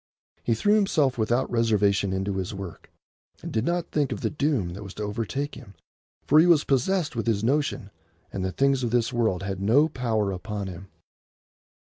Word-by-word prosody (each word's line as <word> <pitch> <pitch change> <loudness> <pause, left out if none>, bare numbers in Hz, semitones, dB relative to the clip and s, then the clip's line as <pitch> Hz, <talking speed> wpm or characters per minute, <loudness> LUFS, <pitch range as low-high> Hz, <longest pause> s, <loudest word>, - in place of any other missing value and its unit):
He 115 - +1
threw 205 - +2
himself 150 - +2
without 120 +4 +1
reservation 105 -4 +2
into 95 +1 -2
his 95 +2 -3
work, 95 -4 -8 0.5
and - - -5
did 110 -1 0
not 175 0 -1
think 145 -3 0
of - - -4
the - - -1
doom 140 - 0
that 95 +4 -8
was 100 -3 -9
to 105 - -4
overtake 115 +7 -3
him, 100 - -12 0.5
for 150 - +5
he 165 - +6
was 165 -4 +5
possessed 150 +4 0
with 115 -2 -3
his 110 -2 +1
notion, 130 -5 0 0.4
and 95 - -3
the 95 - -1
things 135 +4 +2
of 120 - -1
this 120 +1 +1
world 110 -6 0
had 95 -1 -4
no 125 +10 +4
power 110 -8 -1
upon 100 +2 -5
him. 95 +1 -8
115 Hz, 195 wpm, -26 LUFS, 100-140 Hz, 0.5 s, he